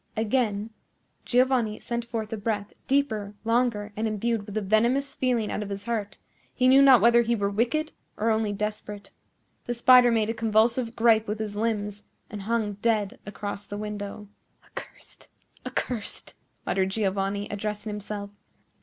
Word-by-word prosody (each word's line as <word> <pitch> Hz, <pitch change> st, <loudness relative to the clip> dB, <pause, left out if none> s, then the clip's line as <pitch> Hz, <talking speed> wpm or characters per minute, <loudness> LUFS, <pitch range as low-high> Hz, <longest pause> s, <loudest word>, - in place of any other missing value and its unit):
Again 220 Hz, -2 st, 0 dB, 0.5 s
Giovanni 245 Hz, -4 st, +2 dB
sent 235 Hz, 0 st, -3 dB
forth 225 Hz, -2 st, -4 dB
a -, -, -2 dB
breath, 205 Hz, -1 st, -3 dB
deeper, 220 Hz, -7 st, 0 dB
longer, 230 Hz, -3 st, 0 dB
and 220 Hz, +1 st, -1 dB
imbued 220 Hz, 0 st, -1 dB
with 205 Hz, +1 st, -5 dB
a -, -, +1 dB
venomous 235 Hz, +8 st, +2 dB
feeling 245 Hz, -4 st, 0 dB
out -, -, -2 dB
of 205 Hz, -, -5 dB
his 200 Hz, 0 st, -5 dB
heart: 205 Hz, -3 st, -3 dB, 0.4 s
he 255 Hz, -, +3 dB
knew 265 Hz, +2 st, +7 dB
not 265 Hz, -5 st, +7 dB
whether 235 Hz, +2 st, +6 dB
he 235 Hz, 0 st, +1 dB
were 200 Hz, -2 st, -1 dB
wicked, 275 Hz, +9 st, 0 dB, 0.3 s
or 225 Hz, +2 st, +1 dB
only 220 Hz, -1 st, +1 dB
desperate. 210 Hz, -1 st, -5 dB, 0.6 s
The 240 Hz, -, -1 dB
spider 250 Hz, +1 st, +7 dB
made 225 Hz, -1 st, +1 dB
a -, -, -3 dB
convulsive 230 Hz, +1 st, +1 dB
gripe 225 Hz, -1 st, +4 dB
with 210 Hz, +1 st, -2 dB
his 210 Hz, -1 st, -4 dB
limbs 210 Hz, -2 st, -2 dB, 0.3 s
and 210 Hz, -2 st, -6 dB
hung 210 Hz, -1 st, -1 dB
dead 225 Hz, 0 st, 0 dB
across 205 Hz, 0 st, -5 dB
the 205 Hz, -, -5 dB
window. 210 Hz, 0 st, -6 dB, 0.4 s
"Accursed! -, -, -11 dB, 0.4 s
accursed!" 230 Hz, -5 st, -4 dB, 0.3 s
muttered 190 Hz, +1 st, +1 dB
Giovanni, 200 Hz, 0 st, -1 dB
addressing 210 Hz, +1 st, -4 dB
himself. 205 Hz, 0 st, -6 dB
215 Hz, 155 wpm, -26 LUFS, 205-235 Hz, 0.6 s, knew